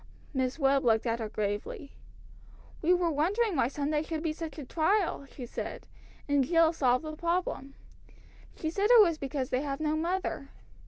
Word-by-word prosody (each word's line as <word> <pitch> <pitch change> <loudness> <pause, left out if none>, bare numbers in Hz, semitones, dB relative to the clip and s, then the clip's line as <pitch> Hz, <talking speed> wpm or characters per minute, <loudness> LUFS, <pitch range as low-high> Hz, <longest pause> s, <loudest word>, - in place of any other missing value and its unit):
Miss 260 0 -1
Webb 275 -2 +3
looked 225 -2 +3
at 230 0 0
her 220 -2 -3
gravely. 210 +7 -4 0.9
"We 335 - +2
were 355 -2 +3
wondering 380 +8 +1
why 260 - +2
Sundays 295 +3 -2
should 320 -1 -3
be 320 -2 0
such 320 -1 -7
a 295 - -6
trial," 330 - 0
she 255 - -8
said, - - -6 0.4
"and 285 -2 +3
Jill 330 +3 +4
solved 255 -2 +2
the 310 0 -5
problem. 335 -5 -2 0.8
She 315 - -3
said 400 +5 +1
it 485 -1 +8
was 335 -6 +3
because 275 -1 -3
they 255 - +1
have 275 -1 -3
no 310 0 0
mother. 335 -3 -2
300 Hz, 175 wpm, -29 LUFS, 270-335 Hz, 0.9 s, it